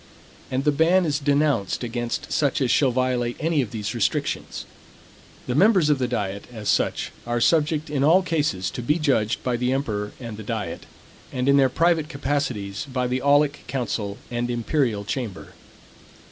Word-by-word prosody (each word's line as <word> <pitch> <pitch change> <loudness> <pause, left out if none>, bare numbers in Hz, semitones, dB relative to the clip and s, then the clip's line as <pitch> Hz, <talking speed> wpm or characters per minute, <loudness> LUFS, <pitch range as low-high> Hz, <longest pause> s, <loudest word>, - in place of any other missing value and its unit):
And 130 +1 -1
the 150 - +3
ban 170 +5 +3
is 145 -2 0
denounced 140 -8 +1
against 120 0 -3
such 140 -3 +1
as 130 -3 +1
shall 140 - +4
violate 125 -1 0
any 160 -2 +1
of 120 - -3
these 105 -2 -4
restrictions. - - -2 0.8
The 125 - -2
members 180 - +4
of 145 - +2
the 125 - 0
diet, 100 -5 -3
as 110 -3 -5
such, - - +1 0.2
are 120 0 0
subject 155 +3 +2
in 145 -2 -1
all 170 +6 +5
cases 150 - -1
to - - -5
be 150 +7 +1
judged 135 -9 +1
by 125 -1 0
the 125 +1 0
emperor 110 -7 -2
and 110 -3 -7
diet, - - -4 0.4
and 125 0 -2
in 140 0 +5
their 135 -1 +5
private 165 +1 +2
capacities 135 -9 -2
by 125 -1 0
the 125 +1 -1
aulic 145 +1 +3
council 110 -6 -3
and 120 0 -2
imperial 120 -3 0
chamber. 115 -3 -4
130 Hz, 170 wpm, -24 LUFS, 120-150 Hz, 0.8 s, all